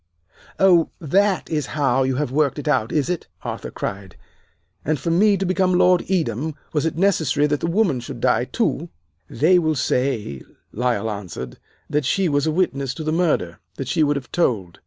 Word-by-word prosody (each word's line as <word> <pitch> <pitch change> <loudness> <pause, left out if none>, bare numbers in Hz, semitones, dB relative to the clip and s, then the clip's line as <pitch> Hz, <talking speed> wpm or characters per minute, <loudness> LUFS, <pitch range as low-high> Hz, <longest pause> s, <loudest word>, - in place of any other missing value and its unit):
"'Oh, 180 -4 +5
that 195 +5 +1
is 150 -3 -2
how 135 -3 +2
you 130 0 +1
have 145 -1 -2
worked 140 -1 +1
it 145 - -6
out, 130 -7 +1
is 150 -2 +1
it?' 180 -1 -3 0.2
Arthur - - -5
cried. 95 -2 -6 0.7
'And 155 0 0
for 165 +6 -2
me 200 +4 +4
to 190 - -2
become 185 0 +1
Lord 180 -1 +4
Edam 160 - -1 0.2
was 155 +1 +1
it 160 - -4
necessary 160 -6 +2
that 150 -1 0
the - - -2
woman 175 - +1
should 125 0 -8
die, 120 +1 +2
too!' 175 - -1 0.4
"'They 175 +8 +3
will 155 -2 0
say,' 125 - -1 0.3
Lyle 120 -2 -1
answered, 90 -12 -7 0.3
'that 150 -2 -1
she 190 +7 +1
was 145 -1 +1
a - - +2
witness 140 -6 -1
to 160 - -5
the 155 - -1
murder 155 - 0 0.2
that 135 - -5
she 160 +4 0
would 145 -1 +3
have 135 -3 -6
told. 105 - -1
150 Hz, 190 wpm, -22 LUFS, 125-175 Hz, 0.7 s, Oh